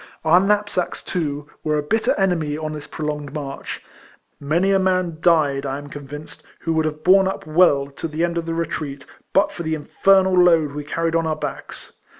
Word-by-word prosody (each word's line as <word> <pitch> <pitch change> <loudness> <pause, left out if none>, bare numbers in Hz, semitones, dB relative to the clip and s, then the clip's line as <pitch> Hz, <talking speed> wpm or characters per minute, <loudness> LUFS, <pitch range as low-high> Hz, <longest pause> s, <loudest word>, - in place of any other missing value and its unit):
Our 165 +3 +6
knapsacks, 205 -2 0
too, 150 -5 -3 0.2
were 155 -1 +1
a 150 - -1
bitter 220 +9 +1
enemy 165 -6 0
on 155 0 -4
this 150 -1 -7
prolonged 150 -2 -5
march. 140 -2 -6 0.6
Many 170 +7 +1
a 195 - +4
man 185 -3 0
died, 150 -6 +3
I 135 -1 -3
am 145 0 -9
convinced, 145 +1 -9 0.2
who 165 - -1
would 160 0 +1
have 155 0 -4
borne 190 +1 +5
up 190 - -4
well 155 -3 +4
to 140 +3 -6
the 160 +1 -2
end 170 0 0
of 165 - -6
the 165 - -2
retreat, 150 -4 -4 0.3
but 195 +2 +3
for - - -7
the 160 -1 -1
infernal 190 +5 +3
load 170 -5 +4
we 145 +1 -5
carried 165 +2 -1
on 165 -1 +1
our 155 - 0
backs. 155 - -7
160 Hz, 195 wpm, -21 LUFS, 150-180 Hz, 0.6 s, Our